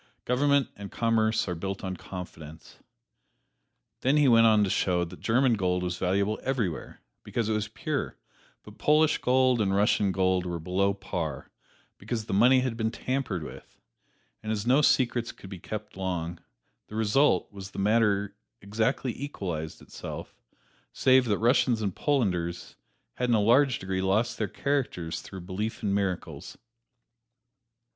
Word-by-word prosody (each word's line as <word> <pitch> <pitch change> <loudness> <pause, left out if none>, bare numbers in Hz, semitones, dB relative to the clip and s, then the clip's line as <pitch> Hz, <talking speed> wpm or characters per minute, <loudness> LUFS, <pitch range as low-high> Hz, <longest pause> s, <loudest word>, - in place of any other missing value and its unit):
Government 140 +2 +2
and 100 -1 -9
commerce 115 -2 +1
are 90 - -1
built 95 +3 -5
on 95 -1 -3
confidence." 80 -4 -10 1.2
Then 135 +4 +2
he 145 -2 +5
went 115 -2 +6
on 110 -2 +5
to 100 - 0
show 90 -2 +1
that 85 - -11
German 125 +2 +2
gold 90 -3 0
was 90 -1 -3
valuable 100 +3 0
everywhere, 115 - -3 0.2
because 115 -2 -2
it - - +1
was 105 0 -1
pure; 110 - -4 0.5
but - - -14
Polish 155 +1 +3
gold 130 -1 +3
and 95 -2 +1
Russian 100 -1 +2
gold 95 -1 +1
were 85 -1 -3
below 95 +4 0
par, 90 -6 -5 0.5
because 110 -3 -4
the - - -4
money 125 +6 +5
had 125 -3 -2
been 110 -1 0
tampered 120 - -3
with, - - -11 0.6
and 110 - -4
as 105 -1 -2
no 130 +4 +4
secrets 120 -4 +2
could 95 - -13
be 95 - -7
kept 110 +4 -7
long, 90 -3 -3 0.5
the 105 - -10
result 110 -1 +2
was 95 -1 -8
the - - -13
matter 105 -1 +2 0.2
exactly 115 +5 -1
equalized 90 - -5
itself, - - -8 0.6
save 130 -1 +4
that 105 -4 +1
Russians 120 0 +3
and 100 -4 -2
Polanders 90 - -1 0.4
had 125 0 0
in 120 - +4
a - - +3
large 125 +4 +4
degree 95 0 -3
lost 105 +5 0
their 110 - 0
characters 120 - -2
through 95 -2 -9
belief 100 +6 -4
in 100 -2 0
miracles. 95 -3 -3
105 Hz, 155 wpm, -27 LUFS, 95-120 Hz, 1.2 s, went